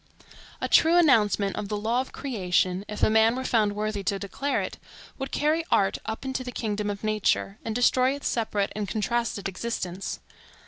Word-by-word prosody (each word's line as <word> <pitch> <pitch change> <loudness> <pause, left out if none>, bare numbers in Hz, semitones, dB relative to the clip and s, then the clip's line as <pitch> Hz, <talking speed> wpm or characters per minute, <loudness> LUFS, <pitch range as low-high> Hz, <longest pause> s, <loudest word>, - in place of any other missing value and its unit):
A - - -1
true 330 +2 +5
announcement 210 - +3
of 200 - -4
the 210 - -1
law 230 +4 +1
of 265 - -8
creation, 185 -7 0
if 210 - -5
a - - +6
man 220 +1 +4
were 260 - -3
found 215 -5 +1
worthy 210 -1 -2
to 200 - 0
declare 240 +8 -2
it, - - -5 0.4
would 270 - -3
carry 310 +3 +1
art 195 -1 +2
up 220 +4 -4
into 265 -1 -2
the 250 - -6
kingdom 210 -3 -2
of 200 0 -5
nature, 215 -1 0
and 225 -1 -3
destroy 255 +2 +3
its 285 - -4
separate 210 -3 -1
and 210 -1 -2
contrasted 220 0 -1
existence. 190 -2 -4
215 Hz, 185 wpm, -26 LUFS, 205-255 Hz, 0.4 s, a